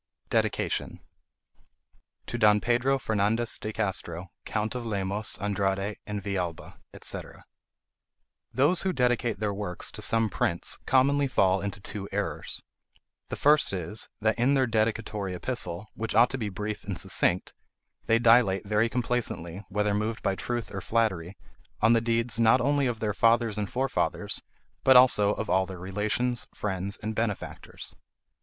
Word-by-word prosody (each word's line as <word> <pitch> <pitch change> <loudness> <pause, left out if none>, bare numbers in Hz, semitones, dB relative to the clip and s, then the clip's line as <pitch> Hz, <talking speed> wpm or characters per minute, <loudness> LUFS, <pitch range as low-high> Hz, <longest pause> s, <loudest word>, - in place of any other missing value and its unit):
DEDICATION - - 0 1.3
TO - - -4
DON 105 -1 +5
PEDRO 120 +4 +2
FERNANDEZ 110 0 0
DE 110 - -4
CASTRO, 95 -4 -3
COUNT 110 0 -2
OF 125 -1 -4
LEMOS, 100 -1 -3
ANDRADE, 100 0 -1
AND 105 -2 -4
VILLALBA, 90 -4 -4 0.2
&c. - - -2 1.3
Those 145 +9 +3
who 190 -1 0
dedicate 120 - +1
their 105 -1 -1
works 100 -3 -4
to - - -8
some 115 0 +3
prince 85 -4 0
commonly 140 +2 +3
fall 95 -6 +2
into 100 0 -4
two 100 0 -6
errors. 100 +1 -3 0.7
The - - -3
first 150 -6 +3
is, 95 +4 -4
that 110 +2 +1
in 130 +4 +3
their 135 -1 +3
dedicatory 110 -4 -1
epistle, 110 -2 0
which 110 -1 -4
ought 120 +2 +6
to 135 - -2
be 105 -3 -2
brief 105 +2 -5
and 100 -3 -4
succinct, 90 +1 +1 0.5
they 115 - +5
dilate 115 -5 +4
very 105 +3 +2
complacently, 115 -7 -2
whether 105 +1 0
moved 110 +2 -2
by 95 - +1
truth 120 +3 -4
or 95 - -4
flattery, 95 -6 0 0.4
on 115 +2 +5
the 115 - +3
deeds 115 0 0
not 115 +2 +5
only 140 +1 +2
of 115 -3 -3
their 105 -2 0
fathers 115 -1 +3
and 105 - -2
forefathers, 135 +1 -1 0.4
but 130 - +6
also 105 -5 +5
of 110 - -4
all 95 +1 +2
their 95 0 -7
relations, 105 +6 0
friends, 100 0 -3
and 110 +1 -2
benefactors. 110 -2 -4
110 Hz, 150 wpm, -27 LUFS, 100-120 Hz, 1.3 s, ought